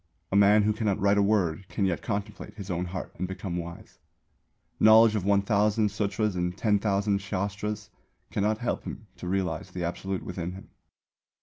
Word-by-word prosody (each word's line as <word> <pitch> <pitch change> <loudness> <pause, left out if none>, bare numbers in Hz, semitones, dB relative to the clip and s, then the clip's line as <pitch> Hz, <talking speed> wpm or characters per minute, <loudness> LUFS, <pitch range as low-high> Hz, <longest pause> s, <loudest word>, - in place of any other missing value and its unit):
A - - 0
man 100 +1 +6
who 105 +1 +2
cannot 105 -3 0
write 100 +1 +3
a - - +5
word, 95 -4 +1
can 100 - 0
yet 90 -3 0
contemplate 105 +1 -4
his 100 -2 -6
own 90 0 -1
heart 90 0 -6
and 90 - -1
become 95 -1 -4
wise. 85 0 -8 0.8
Knowledge 110 0 +7
of 105 -4 -1
1,000 100 +2 +2
Sūtras 105 +1 -1
and 90 +1 -2
10,000 100 -1 +1
Shāstras 100 +2 -3 0.4
cannot 105 +2 +1
help 120 +1 -2
him 110 - -7
to 90 - -7
realise 95 -1 -1
the 90 -1 -5
Absolute 95 +2 -3
within 90 -1 -4
him. 95 - -11
100 Hz, 170 wpm, -27 LUFS, 95-105 Hz, 0.8 s, Knowledge